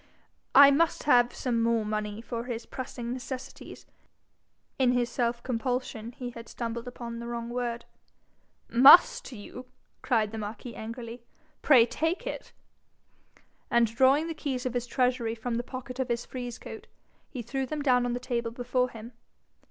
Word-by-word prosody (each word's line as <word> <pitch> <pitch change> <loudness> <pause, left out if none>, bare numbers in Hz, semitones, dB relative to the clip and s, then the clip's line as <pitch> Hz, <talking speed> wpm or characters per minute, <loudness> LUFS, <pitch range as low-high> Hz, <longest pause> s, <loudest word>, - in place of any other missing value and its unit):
'I 280 +1 +10
must 325 +4 +2
have 245 -4 +4
some 235 -3 -1
more 230 -1 +1
money 210 0 -3
for 235 0 -5
his 240 -2 -5
pressing 240 -2 -6
necessities.' 260 +1 -8 0.9
In 250 -2 +4
his 245 -1 0
self 235 0 -1
compulsion 245 -2 -3
he 245 0 -6
had 230 -1 -11
stumbled 235 0 -5
upon 235 -1 -7
the 235 - -6
wrong 235 0 -5
word. 240 -1 -3 0.8
'MUST 285 - +7
you?' 245 +3 -10 0.3
cried 220 -4 +1
the 220 - -5
marquis 215 +3 -6
angrily. 230 +1 -7 0.4
'Pray 255 -6 +6
take 320 +9 -2
it.' - - -6 1.2
And 235 0 +4
drawing 270 +5 +4
the 330 - -3
keys 265 -5 -4
of 255 - -2
his 245 -1 -2
treasury 245 -2 0
from 230 +1 -3
the 240 - -2
pocket 255 0 -8
of 260 - 0
his 235 0 -1
frieze 245 -2 -6
coat, - - -10 0.4
he 250 -3 -6
threw 265 +3 -3
them 300 +2 -3
down 250 -3 +4
on 245 -1 -1
the 245 - -2
table 240 -2 -2
before 250 +1 -1
him. 230 +1 -10
245 Hz, 160 wpm, -28 LUFS, 235-255 Hz, 1.2 s, I